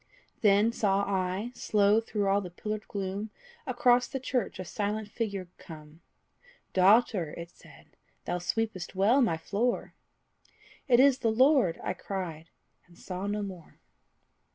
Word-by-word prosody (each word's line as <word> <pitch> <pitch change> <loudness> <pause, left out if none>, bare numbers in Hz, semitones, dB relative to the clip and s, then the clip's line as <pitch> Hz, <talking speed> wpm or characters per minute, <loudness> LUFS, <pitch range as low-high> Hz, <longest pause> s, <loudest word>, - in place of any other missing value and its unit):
Then 210 +1 +4
saw 200 -3 +1
I, 190 +3 -2
slow 210 -2 +3
through 210 -2 -2
all 200 +1 +3
the 180 - -7
pillared 210 +4 -5
gloom, 200 +2 -4 0.4
Across 245 -1 +3
the 270 - -4
church 255 -4 -2
a 185 - -6
silent 210 +2 -3
figure 200 -4 -4
come; 155 0 -12 0.7
"Daughter," 190 -4 +3
it 170 0 -8
said, - - -18 0.4
"thou 180 - -2
sweepest 190 0 -3
well 215 +9 +4
my 195 -10 +2
floor!" 215 +9 -2 0.9
It 245 -3 +5
is 270 -1 +5
the 230 - +1
Lord! 255 - +3
I - - -1
cried; 165 -5 -6 0.4
and 170 -1 -20
saw 185 +1 -5
no 205 0 -2
more. 185 -4 -9
200 Hz, 140 wpm, -29 LUFS, 185-225 Hz, 0.9 s, It